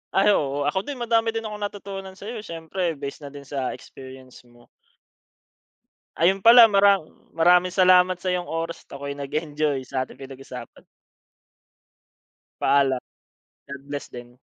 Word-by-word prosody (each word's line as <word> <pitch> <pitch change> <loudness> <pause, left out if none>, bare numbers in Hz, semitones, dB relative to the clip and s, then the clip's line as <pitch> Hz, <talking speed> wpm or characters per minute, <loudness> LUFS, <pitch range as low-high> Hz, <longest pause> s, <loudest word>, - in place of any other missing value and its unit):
Ay 200 +2 +5
oo. 145 -5 0
Ako 190 - -1
din 285 - -4
madami 230 -1 +1
din 225 - -2
akong 210 -1 -6
natutunan 195 -2 -9
sa'yo 215 +4 -7
eh, 210 - -10
siyempre 165 0 -3
base 140 0 -7
na 145 - -9
din 140 -1 -10
sa 135 -2 -4
experience 130 -1 -13
mo. 120 0 -22 1.5
Ayun 190 +4 +2
pala 230 +1 +9
mara 200 -1 +5 0.3
maraming 175 +2 +4
salamat 185 0 +4
sa 185 0 -2
iyong 180 -1 -3
oras 165 +1 -4
at - - -8
ako'y 140 0 -5
nag-enjoy 145 -1 -2
sa 130 -1 -3
ating 130 - -8
pinag-usapan. 135 -2 -10 1.8
Paalam. 135 -2 +3 0.7
God 140 0 -8
bless 145 -1 -5
din. 120 0 -12
165 Hz, 145 wpm, -24 LUFS, 140-195 Hz, 1.8 s, pala